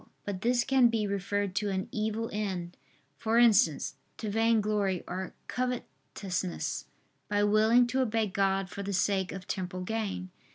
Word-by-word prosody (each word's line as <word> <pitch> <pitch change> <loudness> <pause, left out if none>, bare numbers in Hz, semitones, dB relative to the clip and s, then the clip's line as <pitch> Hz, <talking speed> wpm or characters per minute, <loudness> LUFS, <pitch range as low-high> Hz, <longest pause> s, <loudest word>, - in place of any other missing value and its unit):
But 195 -2 -4
this 240 +2 +2
can 265 -2 +5
be 225 -2 0
referred 200 0 -1
to 210 -1 +1
an 190 -1 -2
evil 220 +1 -1
end, 185 -4 -3 0.4
for 225 0 +1
instance, 205 - +4 0.2
to 215 -2 -4
vainglory 210 -4 +2
or 185 +1 -5
covetousness, 195 - -3 0.4
by 205 0 +2
willing 220 +4 +5
to 255 +2 0
obey 225 -3 +1
God 195 -1 +1
for 190 +2 -7
the 200 0 -3
sake 190 0 +1
of 190 -1 -8
temporal 185 -1 -3
gain. 200 -3 -3
205 Hz, 150 wpm, -30 LUFS, 190-225 Hz, 0.4 s, can